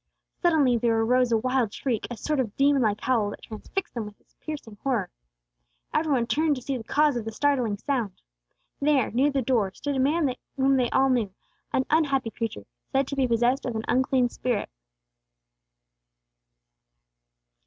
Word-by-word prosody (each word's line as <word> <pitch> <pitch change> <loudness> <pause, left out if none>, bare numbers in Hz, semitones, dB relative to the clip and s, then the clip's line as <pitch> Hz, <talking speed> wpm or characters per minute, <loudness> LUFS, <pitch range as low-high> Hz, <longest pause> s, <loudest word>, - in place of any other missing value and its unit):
Suddenly 290 -9 +3
there 230 -1 +2
arose 250 +2 +2
a 225 - +4
wild 255 -1 0
shriek, 235 -1 -2
a 240 - -6
sort 300 +3 -1
of 230 -5 -2
demon 280 0 +4
like 210 -3 +1
howl 230 -5 +1
that - - -9
transfixed 230 - -5
them 230 -3 -3
with 210 - -13
its - - -36
piercing 260 -9 -7
horror. 235 -9 -1 0.8
Every 310 -1 +1
one 250 -4 +2
turned 305 +4 +1
to 255 - -7
see 275 - -2
the 240 - -5
cause 295 +4 +2
of 240 - -2
the 225 - -5
startling 250 -4 +1
sound. 235 -5 -2 0.6
There, 280 -4 +2
near 265 +5 +3
the 275 -2 0
door, 225 -6 +1
stood 285 -1 -3
a - - 0
man 285 0 +2 0.2
whom 270 0 +3
they 245 -2 +1
all 270 0 +3
knew, 230 -6 +1 0.4
an 260 - +1
unhappy 275 -7 +2
creature 225 - -4 0.3
said 270 +1 +2
to 280 - -3
be 265 -2 +2
possessed 240 +3 +2
of 240 - -3
an 220 - -3
unclean 255 -1 +2
spirit. 240 - -2
255 Hz, 175 wpm, -26 LUFS, 225-275 Hz, 0.8 s, a